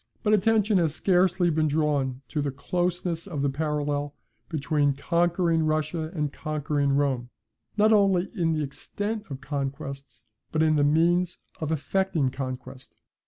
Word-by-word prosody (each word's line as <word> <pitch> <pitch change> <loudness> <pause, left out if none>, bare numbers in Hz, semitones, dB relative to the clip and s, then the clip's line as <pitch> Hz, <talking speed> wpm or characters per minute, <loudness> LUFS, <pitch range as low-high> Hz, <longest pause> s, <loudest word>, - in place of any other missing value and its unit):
But 215 -2 +3
attention 215 -1 +3
has 160 -3 +1
scarcely 180 -1 +3
been 155 0 +2
drawn 140 -4 0
to 150 - -1
the 145 - -1
closeness 175 +4 -2
of 150 -7 -3
the 140 - +1
parallel 145 -1 -2 0.3
between 145 -2 +1
conquering 170 +2 +1
Russia 155 +1 -1
and 150 -3 -1
conquering 145 -2 -1
Rome, 135 -4 0 0.5
not 215 +1 +5
only 195 -3 +3
in 165 -4 +1
the 155 -1 0
extent 205 +9 -5
of 135 -2 -6
conquests, 140 -3 -5 0.3
but 160 0 +2
in 155 -1 +3
the 145 - +3
means 170 +4 +2 0.2
of 155 -1 -2
effecting 160 -2 0
conquest. 130 -1 -7
155 Hz, 145 wpm, -26 LUFS, 140-175 Hz, 0.5 s, not